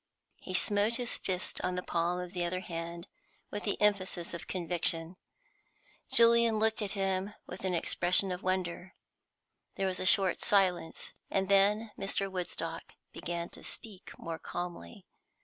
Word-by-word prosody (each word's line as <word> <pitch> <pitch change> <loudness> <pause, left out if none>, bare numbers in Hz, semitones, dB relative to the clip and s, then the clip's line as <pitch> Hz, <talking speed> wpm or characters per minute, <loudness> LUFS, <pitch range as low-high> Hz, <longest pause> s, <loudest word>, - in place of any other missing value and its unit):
He 185 - -5
smote 205 +4 +4
his 245 0 -2
fist 185 -1 -3
on 180 - 0
the 180 - -2
palm 175 +1 0
of 180 0 -6
the 180 -1 -1
other 180 +1 -1
hand 170 -1 -6 0.4
with 205 - -4
the 205 - 0
emphasis 190 -5 +1
of 170 - -6
conviction. 170 -1 0 1.0
Julian 235 -1 +6
looked 220 +1 +1
at 200 -2 -2
him 195 0 -1
with - - -9
an 185 -1 +1
expression 180 +3 +3
of 180 +1 -4
wonder. 185 -1 -2 0.8
There 195 - -1
was 185 -1 -1
a 185 - +1
short 195 -2 +4
silence, 185 -5 +1 0.2
and 195 0 0
then 205 +3 +4
Mr. 195 0 -1
Woodstock 165 -2 -5 0.2
began 170 0 -4
to - - -14
speak 205 -4 -4
more 165 -1 -5
calmly. 175 - -6
185 Hz, 150 wpm, -31 LUFS, 175-200 Hz, 1.0 s, Julian